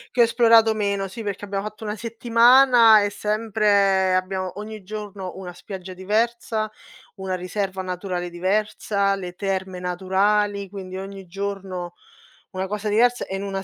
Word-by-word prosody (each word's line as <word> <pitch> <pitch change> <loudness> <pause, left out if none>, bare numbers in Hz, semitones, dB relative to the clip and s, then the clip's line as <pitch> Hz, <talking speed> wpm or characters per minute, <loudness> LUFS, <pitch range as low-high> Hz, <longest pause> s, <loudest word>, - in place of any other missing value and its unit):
Che 245 - +5
ho - - +8
esplorato 230 -1 +5
meno, 200 -2 -1
sì 225 +4 -8
perché 205 -1 -4
abbiamo 200 -1 -3
fatto 215 +1 -8
1 210 0 -3
settimana 230 0 +5
e 205 - 0
sempre 205 -3 +2
abbiamo 185 +1 -2
ogni 215 -1 -8
giorno 205 -2 -6
una 180 -2 -7
spiaggia 185 0 -9
diversa, 215 +2 -1 0.4
una 190 -2 -4
riserva 190 +1 -3
naturale 180 -1 -4
diversa, 200 +2 0
le 180 -2 -7
terme 190 -1 -3
naturali. 195 +3 0
Quindi 185 -1 -7
ogni 195 0 -8
giorno 190 -1 -5 0.6
una 190 -1 -3
cosa 210 +2 -3
diversa 240 +4 +2
e 195 - -4
in - - -5
1 195 -1 -4
200 Hz, 150 wpm, -23 LUFS, 190-215 Hz, 0.6 s, ho